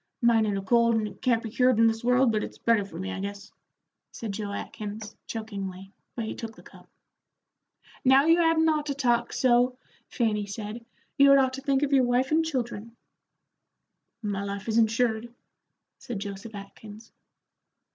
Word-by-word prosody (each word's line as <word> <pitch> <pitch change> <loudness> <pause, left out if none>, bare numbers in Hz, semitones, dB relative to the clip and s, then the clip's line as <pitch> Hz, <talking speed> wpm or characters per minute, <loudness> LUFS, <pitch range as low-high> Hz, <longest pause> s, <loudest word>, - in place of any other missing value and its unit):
"Mine 230 -3 +3
ain't 200 -1 -1
a 195 - -4
cold, 235 +2 +3
and 215 -1 0
it - - -12
can't 235 -2 +1
be 225 - -6
cured 250 0 +3
in 230 - +5
this 225 0 +1
world, 250 0 +4
but 215 -1 0
it's - - -8
better 230 -3 +2
for 195 -4 -10
me, 190 +2 -4
I 195 - -5
guess," 200 +1 -6 0.6
said 225 -3 -6
Joe 205 0 -4
Atkins, 210 +1 -6
chokingly, 195 -4 -6 0.2
but 230 - -3
he - - -4
took 225 -1 -7
the - - -16
cup. - - -17 1.1
"Now, 270 +2 +5
you 330 +2 +5
hadn't 325 -1 +3
ought 305 -1 +1
to 280 - -2
talk 240 -3 +1
so," 250 0 +2 0.3
Fanny 210 -4 0
said. 210 +3 -6 0.4
"You 280 0 +7
had 275 - +8
ought 260 -1 +2
to 270 - -6
think 275 0 +1
of 285 -1 0
your 265 -2 +5
wife 250 +2 +1
and 320 +1 +3
children." 240 -7 -4 1.3
"My 200 -1 -2
life 200 +1 -5
is 225 0 +2
insured," 225 0 +1 0.7
said 240 - -6
Joseph 200 +2 -7
Atkins. 210 +2 -11
230 Hz, 180 wpm, -27 LUFS, 205-255 Hz, 1.3 s, had